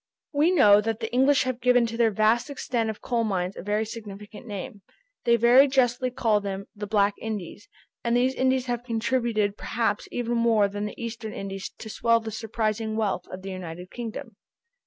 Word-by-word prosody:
We 295 +4 +4
know 210 - +6
that 225 +1 -2
the 225 0 -5
English 265 +2 +4
have 255 -1 -3
given 245 -1 +4
to 230 0 -4
their 230 -1 +3
vast 220 +5 +2
extent 240 -5 -2
of 215 - -6
coal 235 -2 0
mines 185 -3 -1
a - - -7
very 210 +3 0
significant 210 0 -9
name. 205 0 -6 0.4
They 235 -1 +5
very 240 +4 +6
justly 255 -2 +2
call 225 -4 +1
them 195 -1 -4
the 210 0 -6
"Black 200 -1 +3
Indies," 210 -2 -6 0.3
and 235 0 +2
these 255 +2 +2
Indies 260 -1 +1
have 245 -1 -2
contributed 230 -3 0
perhaps 225 -3 -1
even 240 -1 -1
more 225 -3 +3
than 205 +1 -4
the 210 - -7
Eastern 230 -2 -5
Indies 195 0 -5
to - - -9
swell 230 +2 +2
the 225 -1 -6
surprising 220 0 -2
wealth 205 -5 -1
of 185 0 -9
the 195 - -5
United 180 -1 -7
Kingdom. 230 -2 -7
225 Hz, 190 wpm, -26 LUFS, 205-240 Hz, 0.4 s, know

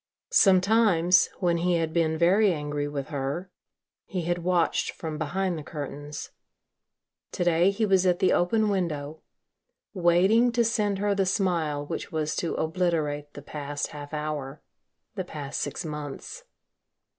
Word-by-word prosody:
Sometimes, 185 - +4
when 175 -2 +2
he 175 +1 +1
had 165 -1 -1
been 160 -2 +1
very 190 +5 +4
angry 150 -2 -2
with 145 -1 -5
her 145 +6 -3 0.6
he 180 -3 -3
had 175 +1 -1
watched 175 -1 +1
from 155 -2 -6
behind 175 +2 -1
the - - -8
curtains. 145 -1 -7 1.0
To - - -1
day, 175 +1 +4
he 210 +3 0
was 190 -2 +3
at 180 -1 +3
the 185 - +3
open 215 +5 +2
window, 160 -6 -2 0.7
waiting 190 +6 +4
to 235 0 +2
send 210 -3 +1
her 205 +1 +1
the 195 -1 +1
smile 170 -7 0
which - - -5
was 155 -1 -1
to 170 - -1
obliterate 155 -3 -1
the 145 - -9
past 145 -1 -4
half 145 -1 -9
hour, 150 -2 -4 0.5
the 195 -4 -3
past 150 -5 -5
six 180 - -4
months. 150 -3 -7
170 Hz, 145 wpm, -26 LUFS, 150-185 Hz, 1.0 s, Sometimes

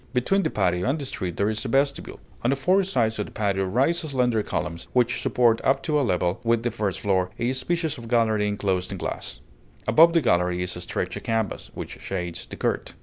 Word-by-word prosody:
Between 195 +11 +2
the 160 - 0
patio 90 -1 +1
and 140 - +1
the 145 - -5
street 90 -9 -4
there 100 - +2
is 110 0 -1
a - - -3
vestibule. 140 +3 0 0.2
On 120 - +1
the 135 - +3
four 180 +9 +3
sides 115 - 0
of 105 - -2
the - - -12
patio 100 -2 0
rise 135 - +2
slender 125 -7 +1
columns, 85 -4 -4
which 120 -1 +2
support, 115 -2 +3
up 135 - +2
to 150 -2 +1
a - - +2
level 90 -6 0
with 115 0 +2
the 120 - 0
first 105 -3 -2
floor, 95 -2 +1
a 120 +2 0
species 160 +2 -2
of 115 - -9
gallery 110 -3 +2
inclosed 95 -3 -1
in 95 - -4
glass; - - -5 0.5
above 160 +9 +6
the 165 - +4
gallery 90 -6 +2
is 90 - -4
stretched 90 - -4
a - - -4
canvas, 115 -2 -2
which - - -7
shades 90 -3 -4
the - - -8
court. - - -2
115 Hz, 220 wpm, -25 LUFS, 95-135 Hz, 0.5 s, above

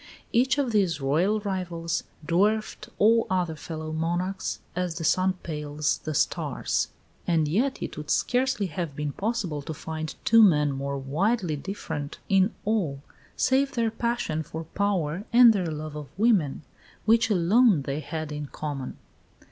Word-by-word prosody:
Each 260 +3 +3
of 275 -4 +1
these 190 -7 +2
Royal 165 +10 +2
rivals 175 -4 -3 0.2
dwarfed 215 +6 +1
all 225 +2 +4
other 180 -3 0
fellow 155 0 -6
monarchs 175 +4 -2 0.2
as 180 -2 -2
the 165 - -4
sun 185 +4 +3
pales 150 -2 -2
the 155 -1 -4
stars; - - 0 0.4
and 160 -3 +2
yet 240 - 0
it - - -6
would 150 -1 -7
scarcely 250 -4 +1
have 165 -3 -4
been 150 0 -2
possible 195 -6 -2
to 160 +2 -6
find 155 +1 -5
two 230 0 +7
men 150 -8 +5
more 140 +1 -3
widely 170 - 0
different 150 -3 -5
in 195 +2 +4
all 170 -11 0 0.3
save 270 +1 +2
their 230 -2 +1
passion 235 -9 -1
for 160 +1 -6
power 185 0 -1
and 240 -1 +8
their 185 -4 -1
love 155 -1 -5
of 150 -2 -6
woman, 195 - +2 0.4
which 225 +1 +4
alone 200 - +4
they 140 +2 -3
had 155 0 -5
in 150 -1 -4
common. 140 -3 -5
175 Hz, 150 wpm, -26 LUFS, 150-215 Hz, 0.4 s, and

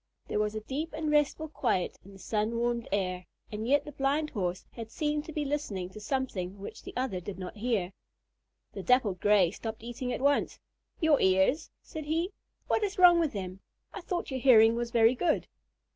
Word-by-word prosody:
There - - -1
was 210 0 0
a 215 - -3
deep 295 +9 -4
and 310 -1 -2
restful 300 +1 +2
quiet 240 - -1
in 200 - -14
the - - -12
sun 215 +3 -1
warmed 235 0 -1
air, 185 -2 -1 0.2
and 215 +1 -4
yet 285 +3 +3
the 295 - -7
Blind 290 +2 0
Horse 185 -3 -2
had 230 -2 -8
seemed 300 +3 -1
to - - -7
be 300 -1 -2
listening 210 -11 -3
to 215 - -10
something 205 -6 -3
which 200 - -8
the - - -9
other 250 -8 -1
did 185 +2 -7
not 185 +3 -7
hear. 205 -5 -1 0.8
The - - -5
Dappled 230 -7 +2
Gray 205 -5 +4
stopped 220 +1 -6
eating 240 +1 -4
at - - -2
once. 285 +2 +1 0.4
"Your 315 -3 +4
ears?" 190 - +3
said 315 -4 -7
he. 330 +5 0 0.4
"What 440 - +1
is 405 -1 -2
wrong 355 -2 +8
with 320 -4 +1
them? 185 -2 -5 0.3
I 405 - -6
thought 350 -3 -3
your 260 - -2
hearing 230 -3 +6
was 235 0 -2
very 230 0 +5
good." 320 +6 0
240 Hz, 200 wpm, -30 LUFS, 205-295 Hz, 0.8 s, wrong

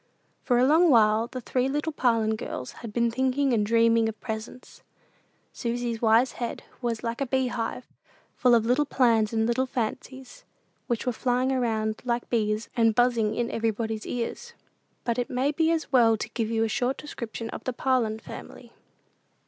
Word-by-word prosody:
For 245 - +1
a 250 - +4
long 325 +5 +5
while 220 -2 +4
the 255 +1 -7
three 255 +2 0
little 295 +3 -1
Parlin 230 -5 +1
girls 130 -11 -6
had 230 - -7
been 235 +1 +1
thinking 260 +2 +1
and 215 -3 +2
dreaming 230 +1 +3
of 220 -2 -8
presents. 220 +2 -7 0.7
Susy's 235 -1 -3
wise 230 +3 +4
head 240 -1 -5 0.2
was 235 -2 -2
like 235 +2 -3
a 275 - 0
beehive, 250 -2 -2 0.5
full 245 -2 +4
of 225 -1 +2
little 260 +5 +2
plans 230 -6 +3
and 220 -1 +1
little 250 +3 0
fancies, 255 +1 -5 0.4
which 235 -1 -2
were 250 - +1
flying 250 +2 0
about 220 -3 -1
like 240 -1 -2
bees, 215 -1 0
and 225 -3 +3
buzzing 240 -3 +2
in 240 0 -1
everybody's 220 -1 -2
ears. 360 - -4 0.5
But 235 0 -1
it 245 - -2
may 260 +3 0
be 320 +2 +1
as 330 -1 -1
well 230 -4 +5
to 220 - -5
give 225 -1 -2
you 225 -1 +1
a - - +1
short 245 +4 -1
description 235 -5 -6
of - - -7
the 255 - 0
Parlin 240 -4 0
family. - - -11
235 Hz, 175 wpm, -26 LUFS, 225-255 Hz, 0.7 s, long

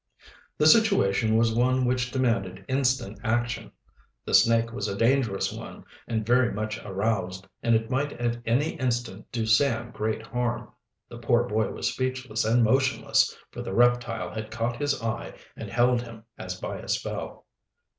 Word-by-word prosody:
The 150 - +2
situation 135 - +4
was 115 0 +3
one 125 +2 +2
which 125 0 0
demanded 115 -8 -1
instant 130 -5 0
action. 120 +2 -1 0.5
The - - -4
snake 115 +3 +4
was 125 - -3
a 100 - -3
dangerous 115 -4 +1
one, - - -9 0.2
and 110 -2 -2
very 120 +1 +3
much 110 +1 -3
aroused, 95 -2 -2 0.2
and 115 -1 +3
it 110 +2 -1
might 140 +3 0
at 120 0 -2
any 130 +8 +1
instant 120 -5 -2
do 115 -2 -1
Sam 120 +1 +2
great 110 +1 -3
harm. 120 0 -3 0.4
The 120 - -10
poor 120 0 +2
boy 110 -3 0
was - - -2
speechless 130 -3 -2
and 115 +2 +3
motionless, 135 +4 +2
for - - -7
the 95 - -5
reptile 120 -1 +2
had 110 0 -5
caught 115 +2 -2
his 145 -3 -1
eye 115 -1 -4 0.2
and - - -7
held 120 0 +2
him 115 -2 -11
as 90 0 -6
by - - -5
a - - -10
spell. - - -4
120 Hz, 165 wpm, -26 LUFS, 110-125 Hz, 0.5 s, situation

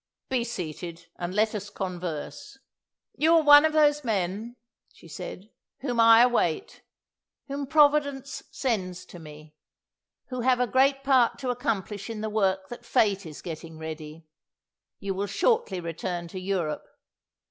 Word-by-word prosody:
Be 255 -2 +1
seated, 170 -5 -6
and 175 +1 -4
let 215 +1 +2
us 205 -1 -5
converse. 180 - -6 0.6
"You 320 +2 +4
are 325 - +5
one 290 +1 +9
of 315 - +1
those 295 -1 +4
men," 215 +1 -2 0.4
she - - -17
said, 200 +4 -8 0.3
"whom 245 -3 -2
I 230 +1 +8
await; 240 -10 0 0.7
whom 280 0 -4
Providence 285 -2 +2
sends 185 -8 -2
to 175 - -12
me; 155 -1 -13 0.8
who 255 -1 -3
have 250 0 +3
a 250 - +3
great 270 +3 +2
part 260 -4 +3
to 255 -2 -2
accomplish 210 - -3
in 220 -2 -5
the 220 0 -3
work 190 -3 +1
that 240 - -9
Fate 200 -4 +1
is 150 - -10
getting 160 -1 -7
ready. 160 0 -8 0.7
You 195 -1 -3
will 200 +2 -2
shortly 445 - +1
return 170 +1 -4
to 185 - -6
Europe. 185 -5 -2
210 Hz, 145 wpm, -27 LUFS, 175-260 Hz, 0.8 s, one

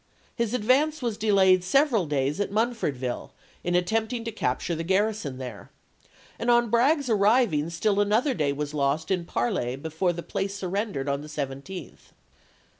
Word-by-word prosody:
His 235 -1 -1
advance 265 +6 +2
was 235 -3 -1
delayed 190 -4 +4
several 230 - +2
days 145 +3 0
at 205 - 0
Munfordville 200 - -2 0.3
in 175 0 0
attempting 220 +6 0
to 230 - -4
capture 150 - -1
the 165 0 -3
garrison 190 -5 0
there, 125 -5 -8 0.7
and 235 - -1
on 240 -2 +4
Bragg's 275 +4 +3
arriving 205 - +3
still 200 +4 0
an 205 0 0
other 250 +6 +3
day 150 - 0
was 145 +1 -4
lost 145 +4 0
in 180 -3 0
parley 120 -2 -1
before 160 +5 -1
the 170 0 -6
place 195 +1 -3
sur 190 -2 -4
rendered 195 -8 -2
on 140 0 -1
the 150 - -9
17th. 145 +4 -7
190 Hz, 165 wpm, -26 LUFS, 150-225 Hz, 0.7 s, delayed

